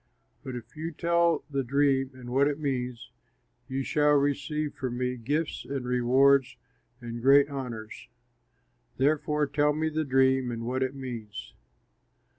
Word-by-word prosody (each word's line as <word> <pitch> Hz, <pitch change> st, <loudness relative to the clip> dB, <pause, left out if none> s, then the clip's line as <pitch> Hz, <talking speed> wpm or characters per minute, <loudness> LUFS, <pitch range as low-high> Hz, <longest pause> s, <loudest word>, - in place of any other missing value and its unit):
But 130 Hz, -, -6 dB
if 120 Hz, -1 st, -10 dB
you 160 Hz, +2 st, -4 dB
tell 170 Hz, 0 st, +1 dB
the 140 Hz, -2 st, -2 dB
dream 135 Hz, 0 st, +2 dB
and 125 Hz, -1 st, -9 dB
what 135 Hz, +3 st, +3 dB
it 145 Hz, -1 st, -1 dB
means, 125 Hz, -4 st, -3 dB, 0.6 s
you 135 Hz, +1 st, -2 dB
shall 150 Hz, +2 st, +2 dB
receive 145 Hz, +1 st, 0 dB
from 125 Hz, -2 st, -4 dB
me 125 Hz, 0 st, -1 dB
gifts 145 Hz, +7 st, -2 dB
and 135 Hz, -2 st, -4 dB
rewards 130 Hz, +1 st, +3 dB, 0.4 s
and 120 Hz, 0 st, -6 dB
great 140 Hz, +3 st, +6 dB
honors; 120 Hz, -6 st, -7 dB, 0.9 s
therefore 150 Hz, +2 st, +1 dB
tell 145 Hz, +1 st, +1 dB
me 160 Hz, +1 st, -1 dB
the 155 Hz, 0 st, -1 dB
dream 130 Hz, -2 st, +2 dB
and 115 Hz, -1 st, -4 dB
what 130 Hz, +2 st, -2 dB
it 130 Hz, +1 st, -1 dB
means." 120 Hz, -6 st, -7 dB
135 Hz, 145 wpm, -28 LUFS, 125-145 Hz, 0.9 s, great